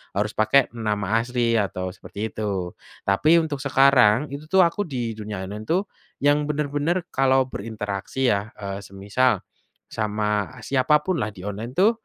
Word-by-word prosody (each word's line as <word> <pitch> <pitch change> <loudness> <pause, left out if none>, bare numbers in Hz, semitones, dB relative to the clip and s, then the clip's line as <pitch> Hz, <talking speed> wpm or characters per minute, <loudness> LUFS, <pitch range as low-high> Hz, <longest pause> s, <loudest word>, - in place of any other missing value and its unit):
harus 105 +2 0
pakai 130 +5 +4
nama 105 -1 0
asli 120 -1 0
atau 95 -2 -2
seperti 105 +2 -6
itu, 95 -5 -3 0.3
tapi 155 +13 +5
untuk 150 -4 -3
sekarang 135 -2 +5
itu 145 +2 -6
tuh 190 - +4
aku 185 +5 0
di 120 -5 -3
dunia 105 -3 -5
online 105 +2 -6
itu, 170 - +3 0.5
yang 145 +1 +4
bener-bener 150 +4 -1
kalau 130 -1 +3
berinteraksi 110 +4 -3
ya, 100 +2 -1
eee, 100 -1 -5
semisal, 100 +5 +1 0.5
sama 105 +2 -1
siapapunlah 145 - +1
di 90 - -10
online 110 +4 -5
tuh, 200 +5 +5
115 Hz, 145 wpm, -24 LUFS, 105-140 Hz, 0.5 s, tapi